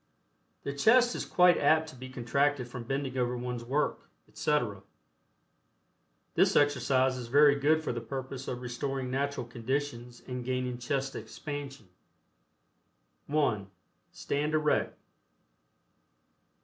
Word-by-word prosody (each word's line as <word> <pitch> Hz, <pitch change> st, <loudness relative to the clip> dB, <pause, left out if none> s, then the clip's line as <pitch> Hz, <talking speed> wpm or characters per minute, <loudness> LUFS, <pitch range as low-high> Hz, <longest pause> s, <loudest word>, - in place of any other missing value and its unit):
The 140 Hz, -, -3 dB
chest 240 Hz, -, +5 dB
is -, -, -3 dB
quite 180 Hz, -1 st, +5 dB
apt 160 Hz, 0 st, +3 dB
to 155 Hz, -, -12 dB
be 130 Hz, +1 st, -9 dB
contracted 130 Hz, +2 st, 0 dB
from 120 Hz, -1 st, -7 dB
bending 135 Hz, 0 st, -2 dB
over 125 Hz, 0 st, 0 dB
one's 125 Hz, -1 st, -4 dB
work, 140 Hz, +5 st, -1 dB, 0.2 s
etc. 120 Hz, -10 st, -1 dB, 1.5 s
This -, -, +3 dB
exercise 130 Hz, -2 st, +3 dB
is 120 Hz, -2 st, -6 dB
very 145 Hz, +3 st, +6 dB
good 150 Hz, +3 st, +2 dB
for 150 Hz, -, -2 dB
the 120 Hz, -, -4 dB
purpose 135 Hz, 0 st, -6 dB
of 125 Hz, 0 st, -4 dB
restoring 130 Hz, +1 st, -3 dB
natural 140 Hz, -1 st, -1 dB
conditions 120 Hz, 0 st, -4 dB
and 125 Hz, -1 st, -4 dB
gaining 125 Hz, -1 st, -2 dB
chest 135 Hz, +2 st, -2 dB
expansion. 140 Hz, 0 st, -7 dB, 1.4 s
(1) 130 Hz, -10 st, 0 dB, 0.4 s
Stand 150 Hz, +2 st, -1 dB
erect. 150 Hz, -1 st, +1 dB
135 Hz, 120 wpm, -30 LUFS, 125-145 Hz, 1.5 s, very